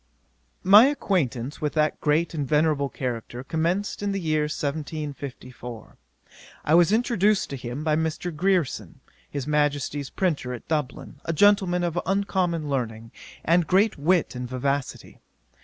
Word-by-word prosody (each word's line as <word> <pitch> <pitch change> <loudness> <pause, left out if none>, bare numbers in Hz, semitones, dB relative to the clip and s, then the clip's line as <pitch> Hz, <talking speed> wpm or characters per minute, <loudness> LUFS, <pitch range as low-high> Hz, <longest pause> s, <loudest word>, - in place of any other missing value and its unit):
'My 205 +5 +8
acquaintance 150 - -1
with 150 -1 -1
that 155 -1 0
great 155 +4 +1
and 145 -4 -2
venerable 150 -2 +2
character 125 -1 -5
commenced 170 +9 -1
in 200 -1 -1
the 195 - -1
year 155 -3 0
1754. 140 -5 -6 0.7
I 150 - +2
was 175 +2 +6
introduced 215 - +2
to - - -3
him 125 +3 -6
by 155 -1 +2
Mr. 160 +1 -2
Grierson, 165 - 0 0.3
his 140 -3 -4
Majesty's 145 -2 0
printer 145 -9 -1
at 120 - -12
Dublin, 150 -2 -3
a 165 - -1
gentleman 185 -1 +3
of 175 0 -1
uncommon 185 -5 0
learning, 115 -5 -3 0.3
and 170 0 +3
great 195 +4 +3
wit 170 +1 +2
and 125 -1 -5
vivacity. 135 +2 -3
155 Hz, 140 wpm, -25 LUFS, 140-180 Hz, 0.7 s, My